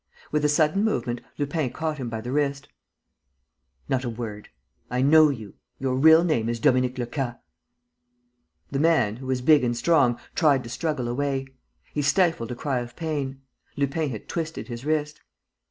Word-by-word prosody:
With 150 -1 +1
a 150 - +3
sudden 155 +6 +2
movement, 125 - -1 0.2
Lupin 145 -1 -1
caught 155 +2 -3
him 125 -3 -4
by 110 -1 -4
the 125 - -5
wrist: 140 -1 -1 1.2
"Not 130 -1 0
a 120 - -2
word.... 110 -3 -6 0.4
I 125 +1 0
know 155 +2 +7
you.... 110 -8 -6 0.2
Your 130 -1 -1
real 160 +5 +7
name 120 -10 +1
is 120 0 -2
Dominique 130 0 +2
Lecas!" 120 0 -3 1.4
The 135 - -1
man, 155 -9 +3
who 130 +1 -9
was 130 -1 -1
big 150 +1 +5
and 120 -1 0
strong, 130 -5 +3
tried 145 -6 +3
to 115 - -8
struggle 150 -4 -2
away. 135 +2 -1 0.5
He 150 - 0
stifled 145 - +2
a - - -3
cry 135 0 -1
of 120 0 -7
pain: 140 -5 -3 0.4
Lupin 145 +2 0
had 110 -5 -7
twisted 160 -4 -4
his 120 +1 -6
wrist. 150 -1 -1
135 Hz, 170 wpm, -25 LUFS, 120-155 Hz, 1.4 s, know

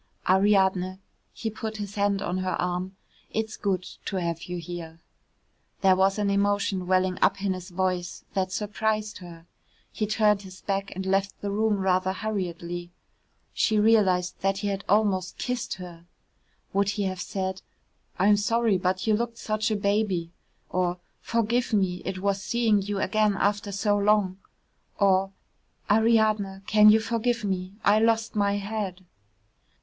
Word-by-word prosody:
"Ariadne," 190 -1 +3 0.3
he 225 - -4
put 220 0 -5
his 205 -1 -5
hand 200 -1 0
on 180 +1 -2
her 185 -1 -2
arm, 180 +2 -2 0.3
"it's 220 0 -3
good 190 -3 -1 0.2
to 195 - -3
have 170 -3 -2
you 180 0 -5
here." 165 -1 -7 0.8
There 190 -1 +5
was 195 +2 +2
an 205 -1 +1
emotion 200 -2 +1
welling 185 0 +1
up 195 0 +2
in 195 -2 +1
his 185 -1 -8
voice 180 -1 -2
that 185 -1 -1
surprised 215 +1 -2
her. 170 -2 -12 0.5
He 215 - -2
turned 210 -1 +3
his 185 -1 -12
back 195 0 -2
and 190 +1 -4
left 195 +1 0
the 200 - -2
room 215 0 +1
rather 190 -1 +1
hurriedly. 175 -4 -4 0.6
She 215 - +2
realised 205 -5 +3
that 195 0 +1
he 205 +1 -2
had 195 0 -3
almost 195 -3 +2
kissed 250 0 -3
her. 175 -2 -11 0.7
Would 200 0 +2
he 205 0 -1
have 185 -2 -2
said, 190 -1 -3 0.6
"I'm 205 +2 +4
sorry, 225 -1 +2
but 185 +1 -1
you 220 - +3
looked 230 +1 -3
such 215 0 -1
a 215 - +1
baby," 200 -4 0 0.4
or, 180 -1 0 0.2
"Forgive 235 +1 0
me, 185 -3 +1
it 190 0 -3
was 195 +1 -1
seeing 220 -2 +2
you 205 +1 -3
again 210 +1 +2
after 205 +1 0
so 205 +1 +1
long," 200 -2 +2 0.6
or, 195 -1 +3 0.6
"Ariadne, 215 -3 +3
can 215 0 +6
you 215 +1 +6
forgive 230 +1 -1
me? 190 -1 -3
I 210 +1 +5
lost 225 0 +1
my 200 -1 +2
head." 200 -2 -4
200 Hz, 155 wpm, -26 LUFS, 185-210 Hz, 0.8 s, can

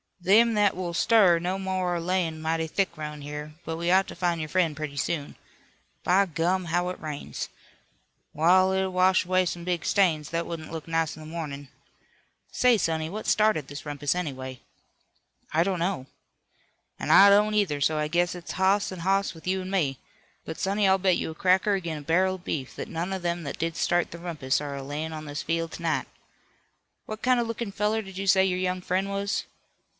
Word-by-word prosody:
"Them 215 +6 +5
that 205 -2 +3
will 175 -1 -4
stir 190 -2 +5
no 180 +3 -2
more 185 -2 -1
are - - -1
layin' 170 -2 -1
mighty 160 0 0
thick 190 +1 -1
'roun' 150 -1 -6
here, 150 +1 -7
but 160 0 -3
we 170 +1 -1
ought 190 +2 +4
to - - -8
find 170 -1 0
your 155 -1 -4
friend 170 -4 +1
pretty 145 -1 -5
soon. 145 -1 -2 0.7
By 195 +2 +3
gum, 175 +3 0
how 175 +2 0
it 180 - -6
rains! 145 - -5 0.9
W'all, 185 +4 +4
it'll 190 0 0
wash 185 0 +3
away 185 0 +2
some 170 0 -4
big 175 -1 -1
stains, 160 -7 +2
that 165 0 -2
wouldn't 160 -2 -6
look 160 -1 -6
nice 165 -1 0
in 155 - -12
the 155 - -9
mornin'. 145 -4 -6 0.8
Say, 250 -2 +4
sonny, 160 -4 -1
what 215 +5 -6
started 215 -10 +2
this 145 +2 -8
rumpus, 145 -1 -1
anyway?" 130 -7 -5 0.9
"I 165 +2 +4
don't 190 -1 -1
know." 175 -6 -1 0.9
"An' - - -4
I 200 +1 +9
don't, 210 +1 +4
either, 175 -9 +1
so 155 +2 +2
I 150 0 0
guess 175 +3 +1
it's 175 -1 -7
hoss 190 +2 +2
an' 185 - -7
hoss 195 +3 +1
with 160 +2 -12
you 190 +1 0
an' 185 +1 -6
me. 145 -9 0 0.5
But, 160 - -6
sonny, 200 +1 +1
I'll 190 0 +4
bet 185 -1 +3
you - - -3
a - - -10
cracker 190 +4 +3
ag'in 170 -5 -3
a - - -7
barrel 185 +5 +2
of 180 - -13
beef 135 -7 -4
that - - -6
none 170 +3 -3
of 190 -2 -4
them 175 0 -1
that 140 - -6
did 165 -1 -1
start 175 0 +1
the 170 - -8
rumpus 150 -6 -1
are 145 -1 -4
a 140 - -6
layin' 150 +3 -4
on 155 0 -6
this 145 -1 -5
field 165 0 -1
to - - -8
night. 165 -1 0 1.0
What 215 0 -7
kind 255 -1 +4
of 235 - 0
lookin' 230 -2 -4
feller 210 +2 0
did 195 -1 -9
you 195 - -3
say 190 0 +5
your 185 -1 0
young 185 0 -1
friend 185 +2 -1
was?" 200 +1 -2
175 Hz, 210 wpm, -26 LUFS, 155-190 Hz, 1.0 s, I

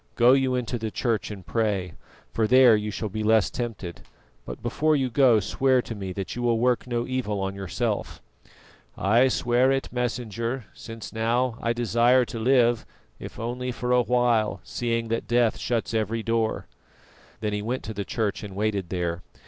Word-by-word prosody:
Go 120 +2 +6
you 135 -1 +2
into 125 -1 -2
the 110 0 -3
church 115 -1 -1
and 100 -4 -8
pray, 100 -6 -1 0.4
for 110 -1 +1
there 125 -1 +7
you 105 0 -2
shall 110 +1 -3
be 110 +2 -4
less 110 -1 +3
tempted; 110 -8 -5 0.5
but - - -8
before 155 0 +1
you 130 -3 0
go, 120 -3 +5
swear 130 +6 +2
to - - -6
me 95 -3 -5
that 95 0 -5
you 120 - -4
will 120 -1 +2
work 125 +1 +1
no 120 -1 -1
evil 125 -6 -2
on 95 0 -2
yourself." 100 +3 -3 0.8
"I 115 +7 +4
swear 125 +1 +2
it, 135 -1 -2
Messenger, 120 0 -3
since 115 -5 -9
now 115 +2 0
I 115 - 0
desire 120 +2 +3
to 115 -1 -6
live, 120 -1 +3 0.4
if - - -9
only 125 +2 -3
for 125 0 -3
awhile, 120 -4 +2
seeing 115 -1 -2
that 115 0 -2
death 120 -1 +2
shuts 115 -1 -2
every 110 0 -1
door." 115 -1 0 0.7
Then 105 -1 -2
he 105 - -1
went 120 +5 -3
to 110 - -5
the 100 0 -3
church 105 0 -2
and 100 -2 -8
waited 100 -3 -1
there. 85 -2 -2
115 Hz, 180 wpm, -25 LUFS, 105-125 Hz, 0.8 s, there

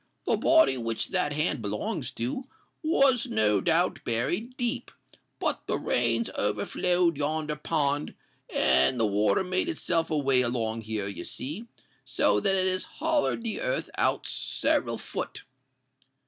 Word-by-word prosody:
"The - - +3
body 320 - +4
which 115 -2 -2
that 180 -6 0
hand 150 -3 0
belongs 105 0 -3
to, 125 - -3 0.4
was 275 -6 +3
no 105 -2 +2
doubt 170 - +2
buried 180 - -2
deep; 240 -2 -2 0.5
but - - -2
the - - +1
rains 115 -1 +1
overflowed 170 - 0
yonder 150 +1 -1
pond, 150 -1 -1 0.4
and 65 - +3
the 115 - +3
water 105 - +2
made 185 - 0
itself 170 - 0
a 155 - 0
way 135 -3 +3
along 115 -2 -1
here, 110 -2 -3
you 90 -4 -6
see—so 135 - -2
that 195 - +2
it 190 0 +2
has 185 0 0
hollered 315 -6 +1
the 230 - -3
earth - - -2
out - - +1
several - - 0
foot." - - -6
145 Hz, 140 wpm, -27 LUFS, 115-185 Hz, 0.5 s, body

